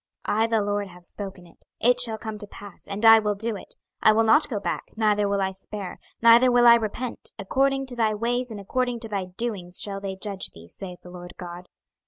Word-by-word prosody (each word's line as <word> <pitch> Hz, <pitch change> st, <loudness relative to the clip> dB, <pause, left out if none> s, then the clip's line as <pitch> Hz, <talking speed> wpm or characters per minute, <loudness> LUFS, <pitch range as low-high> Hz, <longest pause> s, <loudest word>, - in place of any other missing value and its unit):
26:024:014 210 Hz, -, +1 dB
I 225 Hz, -, +3 dB
the 225 Hz, -1 st, +1 dB
LORD 205 Hz, 0 st, -1 dB
have 180 Hz, -1 st, -15 dB
spoken 195 Hz, -1 st, -7 dB
it: 170 Hz, -, -21 dB
it 245 Hz, +1 st, +3 dB
shall 230 Hz, -3 st, +4 dB
come 220 Hz, -1 st, -6 dB
to 205 Hz, -, -7 dB
pass, 205 Hz, 0 st, -12 dB
and 205 Hz, +3 st, -3 dB
I 225 Hz, 0 st, +9 dB
will 210 Hz, -1 st, -1 dB
do 220 Hz, +2 st, -3 dB
it; 195 Hz, -, -9 dB, 0.3 s
I 215 Hz, -, +6 dB
will 225 Hz, +1 st, +3 dB
not 290 Hz, +8 st, +4 dB
go 215 Hz, -6 st, -2 dB
back, -, -, -3 dB
neither 210 Hz, -2 st, +2 dB
will 200 Hz, -1 st, +1 dB
I 190 Hz, -, -1 dB
spare, 195 Hz, 0 st, -8 dB, 0.2 s
neither 235 Hz, +2 st, +7 dB
will 245 Hz, 0 st, +4 dB
I 235 Hz, -, +10 dB
repent; 235 Hz, +2 st, -2 dB
according 270 Hz, +6 st, 0 dB
to 255 Hz, -2 st, -9 dB
thy 220 Hz, -2 st, +1 dB
ways, 245 Hz, +3 st, -1 dB
and 215 Hz, -2 st, -7 dB
according 245 Hz, +4 st, -2 dB
to 225 Hz, -, -6 dB
thy 200 Hz, -3 st, -3 dB
doings, 185 Hz, -2 st, -4 dB
shall 195 Hz, -1 st, 0 dB
they 195 Hz, -1 st, -4 dB
judge 195 Hz, 0 st, -3 dB
thee, 85 Hz, +1 st, -14 dB
saith 180 Hz, -, -9 dB
the 180 Hz, -, -12 dB
Lord 175 Hz, 0 st, -10 dB
GOD. 175 Hz, 0 st, -9 dB
210 Hz, 235 wpm, -25 LUFS, 195-230 Hz, 0.3 s, I